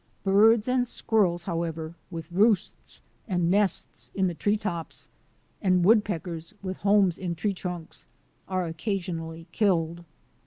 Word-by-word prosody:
Birds 210 +3 +5
and 250 -1 +2
squirrels, 185 -8 +1
however, 165 -2 -3 0.2
with 165 -2 -7
roosts 205 +2 +1 0.2
and 175 -4 +1
nests 200 0 +1
in 190 - +2
the 180 - 0
tree 205 +6 +1
tops, 175 -6 -4 0.5
and 185 -3 +3
wood 215 +1 +6
peckers 170 -1 -5
with 185 -1 -4
homes 200 -3 +3
in 175 -2 -3
tree 200 +5 -1
trunks, 180 -3 -6 0.4
are 185 -1 -1
occasionally 165 -2 -4
killed. 170 -4 +1
185 Hz, 130 wpm, -27 LUFS, 170-205 Hz, 0.5 s, wood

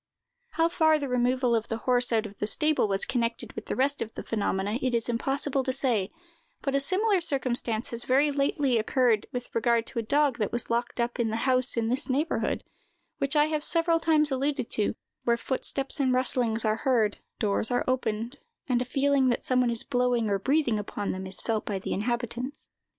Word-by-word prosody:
How 330 0 +3
for 315 -2 +3
the 285 -2 -3
removal 250 0 +1
of 225 0 0
the 225 - -3
horse 245 -1 +4
out 225 -1 +1
of 205 -1 -10
the 210 - -1
stable 305 0 +1
was 195 -1 -1
connected 230 -2 -2
with - - -8
the - - -2
rest 280 +2 +1
of 225 - -3
the - - -6
phenomena, 205 0 -1
it 255 -2 0
is 230 - +1
impossible 270 +3 -1
to 260 - -1
say; 240 -7 0 0.5
but 275 - -1
a 275 - +3
similar 380 +6 +2
circumstance 250 -7 0
has 235 0 -5
very 280 +3 +3
lately 275 -3 +1
occurred 230 -1 +1
with 250 -1 -6
regard 230 0 +2
to 235 - -2
a - - 0
dog 280 +2 +1
that 210 - -1
was 240 -1 -1
locked 240 +1 -1
up 240 +1 -1
in 230 -2 +1
the 220 - -2
house 255 -1 +2
in 225 -1 +1
this 260 +4 +1
neighborhood, 295 +5 -1 0.6
which 275 +2 +1
I 295 0 +5
have 305 -1 -2
several 330 0 +2
times 310 -2 +2
alluded 270 -1 -1
to, 210 0 +1 0.3
where 235 0 +2
footsteps 270 +3 -2
and 265 -2 +2
rustlings 245 -3 +1
are 215 0 +1
heard, 225 -4 +1 0.2
doors 210 +1 +1
are 245 0 0
opened, 245 0 -2 0.3
and 250 -2 +1
a - - -1
feeling 275 0 +2
that 240 - -1
some 255 -1 +3
one 245 - +2
is 235 -1 -1
blowing 245 -4 0
or 200 - +1
breathing 265 -1 +1
upon 205 0 -4
them 190 0 -5
is 190 - -4
felt 220 -2 -1
by 200 - -3
the 190 - -4
inhabitants. 240 +5 -3
250 Hz, 210 wpm, -27 LUFS, 230-275 Hz, 0.6 s, I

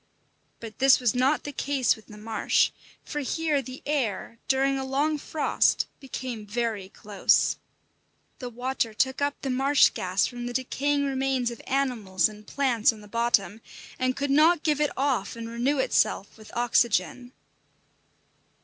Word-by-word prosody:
But 225 -2 -10
this 270 0 +6
was 245 -4 +1
not 260 +4 +2
the 290 - -5
case 275 -2 +1
with 220 - -18
the 210 - -12
marsh, 220 +1 +1 0.3
for 295 - -5
here 295 +1 0
the 255 0 -10
"air," 230 -6 -2
during 270 0 +2
a - - -3
long 290 +3 0
frost, 305 +2 +1
became 255 -4 -6
very 215 -3 -2
close. 200 -1 +1 0.8
The 250 - -5
water 245 -2 -2
took 265 +4 0
up 285 0 -1
the 270 - -1
marsh 270 +3 +4
gas 185 +1 0
from 245 -1 -5
the 245 - -5
decaying 280 +3 0
remains 265 -2 0
of 235 - -9
animals 230 -10 +1
and 210 0 -13
plants 250 -6 +2
on 220 -2 -12
the 210 - -13
bottom, 225 -1 0 0.4
and 255 0 0
could 280 0 -1
not 310 +3 +4
give 300 -2 +1
it 295 - +2
off 260 -8 0
and 230 0 -6
renew 240 +5 0
itself 215 -6 +1
with 215 -1 -14
oxygen. 240 0 +1
255 Hz, 160 wpm, -26 LUFS, 225-275 Hz, 0.8 s, this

